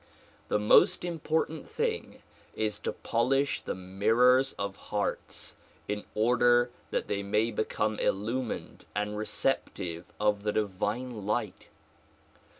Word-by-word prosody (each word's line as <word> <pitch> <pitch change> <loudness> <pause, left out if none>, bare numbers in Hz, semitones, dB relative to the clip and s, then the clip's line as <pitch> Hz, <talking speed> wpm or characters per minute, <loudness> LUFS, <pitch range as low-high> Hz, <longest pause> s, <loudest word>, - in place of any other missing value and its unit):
The - - +2
most 105 +10 +5
important 160 -1 -1
thing 460 0 -2 0.3
is 110 -1 -1
to - - -2
polish 135 +4 +1
the - - -3
mirrors 115 +8 +3
of 100 -1 -4
hearts 105 -1 -2 0.3
in 105 0 -3
order 120 +2 +4 0.2
that - - -1
they 100 -1 -1
may 105 +3 +1
become 110 0 -1
illumined 115 +5 -2
and 105 0 -1
receptive 95 -6 -2
of 105 -1 +2
the 105 0 -1
divine 105 +2 -2
light. 105 -2 -2
110 Hz, 115 wpm, -30 LUFS, 105-125 Hz, 0.3 s, most